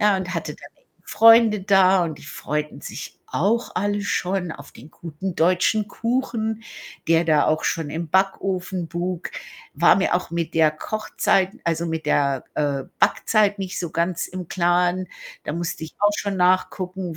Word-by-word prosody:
ja, 205 -2 +4
und 185 -1 -4
hatte 170 - -4
dann - - -13 0.4
Freunde 225 -1 +6
da 190 -2 +4
und 155 -3 -5
die - - -14
freuten 150 0 -4
sich - - -8
auch 220 +7 0
alle 205 +2 -1
schon 180 -2 -1
auf 145 -1 -12
den 145 +7 -14
guten 170 +3 -6
deutschen 185 +5 +2
Kuchen, 230 -2 -2 0.5
der 165 0 +4
da 155 -2 +3
auch 155 0 +1
schon 160 -3 -1
im 165 +1 -4
Backofen 190 -1 0
buk. 175 +2 -4 0.4
War - - +5
mir 190 -2 +1
auch 180 - -2
mit 170 -1 -3
der 160 -1 +4
Kochzeit 190 +2 0
also, 170 0 0
mit 160 -1 -4
der, 140 -3 +1
äh, 140 -2 -1
Backzeit 210 -2 +2
nicht 190 -1 -4
so 170 -3 -4
ganz 170 +1 -1
im 180 -2 -7
Klaren. 180 +1 +1 0.4
Da - - -3
musste 170 -1 -4
ich 160 - -11
auch 205 0 +4
schon 200 -2 -2
nachgucken, 185 -1 0
180 Hz, 165 wpm, -22 LUFS, 165-195 Hz, 0.5 s, Freunde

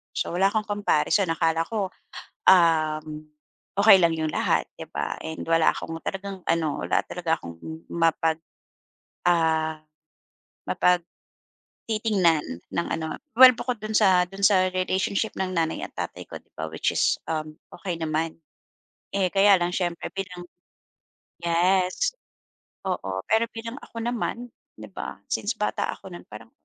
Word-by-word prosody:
so, - - 0
wala 190 +2 +4
akong 215 +1 0
comparison. 205 -2 +2
Akala 165 0 +1
ko, 205 -4 -2 0.6
uhm, 155 -3 +3 0.5
okey 205 -1 +9
lang 170 -1 +4
yung 160 -1 -1
lahat, - - +1
'di - - -8
ba, - - -3
and 160 0 -5
wala 165 -1 +4
akong 165 - -6
talagang 195 0 -5
ano 160 -3 0
wala - - +2
talaga 170 -2 -1
akong 85 -1 -9 0.4
mapag 165 -1 +1 0.9
ah 160 -2 +2 1.9
mapagtitignan 205 -8 +1 0.3
ng 170 - -1
ano 160 -1 -4 0.2
well 255 +1 +10
bukod 245 0 -3
do'n 215 +1 -5
sa 190 -4 +5
do'n 195 +2 -9
sa 185 -2 +4
relationship 190 +3 0
ng 190 -1 -1
nanay 165 -1 0
at - - -6
tatay - - -5
ko, - - -9
'di - - -35
ba, 80 +1 -4
which 80 - -1
is, - - +3
uhm, 155 -1 -3 0.2
okey 175 0 -4
naman. 160 0 -2 0.8
Eh, 195 -2 +1
kaya 200 0 +6
lang 175 0 0
siyempre 175 -2 -2
bilang 185 -2 -6 1.0
yes 185 - +2 0.7
oo, 95 - -2
pero 225 +1 +3
bilang 230 +2 -6
ako 230 - -7
naman, 240 0 -3 0.3
'di 110 0 -9
ba, - - -7
since - - -1
bata - - -1
ako - - -12
nun 85 +1 -9
parang 110 +1 -11
175 Hz, 140 wpm, -25 LUFS, 160-200 Hz, 1.9 s, well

